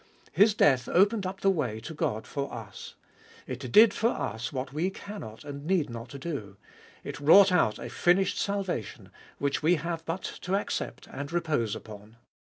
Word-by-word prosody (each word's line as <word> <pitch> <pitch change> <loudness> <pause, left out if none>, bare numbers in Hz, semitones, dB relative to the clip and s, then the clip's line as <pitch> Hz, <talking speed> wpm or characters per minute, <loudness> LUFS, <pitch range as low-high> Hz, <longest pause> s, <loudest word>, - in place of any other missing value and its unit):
His 210 +1 +4
death 130 -10 +3
opened 200 +1 +3
up 190 +1 -7
the 195 - +4
way 125 - -2
to 160 - -7
God 110 -7 -2
for 140 -1 -4
us. 110 -5 -9 0.5
It 130 -1 -6
did 215 - +7
for 230 - +1
us 115 - -3
what 130 -1 -4
we 165 +5 0
cannot 190 - -9
and 140 0 -7
need 175 -8 +1
not 115 +4 -8
do; 130 - -5 0.5
it - - -6
wrought 185 +7 +7
out 135 -12 +3
a - - -7
finished 180 +2 +2
salvation, 195 - -3 0.3
which 140 0 -1
we 165 +3 +4
have 165 0 -4
but 165 +3 -3 0.2
to 185 +2 -1
accept 200 - -3
and 140 +1 -6
repose 155 -11 0
upon. 105 +1 -11
150 Hz, 175 wpm, -28 LUFS, 120-190 Hz, 0.5 s, did